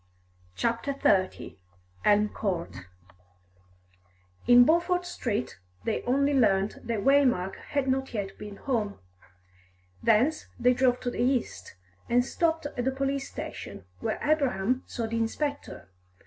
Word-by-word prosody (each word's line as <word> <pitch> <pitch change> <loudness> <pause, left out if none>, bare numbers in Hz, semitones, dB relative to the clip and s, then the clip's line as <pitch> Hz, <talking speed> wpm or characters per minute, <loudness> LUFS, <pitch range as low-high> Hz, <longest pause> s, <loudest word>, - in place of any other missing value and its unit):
CHAPTER 235 +4 -1
XXX 190 -8 +1 0.5
ELM 210 0 +4
COURT 170 - -4 1.6
In 245 0 +8
Beaufort 350 +3 +2
Street 210 - -3 0.2
they - - -1
only 280 +3 +2
learnt 210 -4 +1
that 230 -3 -1
Waymark 255 -10 +3
had 280 -2 -2
not 265 0 0
yet 200 -4 -4
been 210 -1 -8
home. 215 -4 -2 1.0
Thence 250 +8 +2
they 250 +1 +4
drove 250 -1 +2
to 245 - -2
the - - -3
east, 245 - -1 0.3
and 245 +1 +3
stopped 325 +2 0
at 250 -3 -3
a - - +3
police 275 +1 -2
station, - - -8
where - - -2
Abraham 260 -6 +1
saw 235 - -3
the 225 +1 -3
inspector. 280 - -3
245 Hz, 125 wpm, -28 LUFS, 210-275 Hz, 1.6 s, In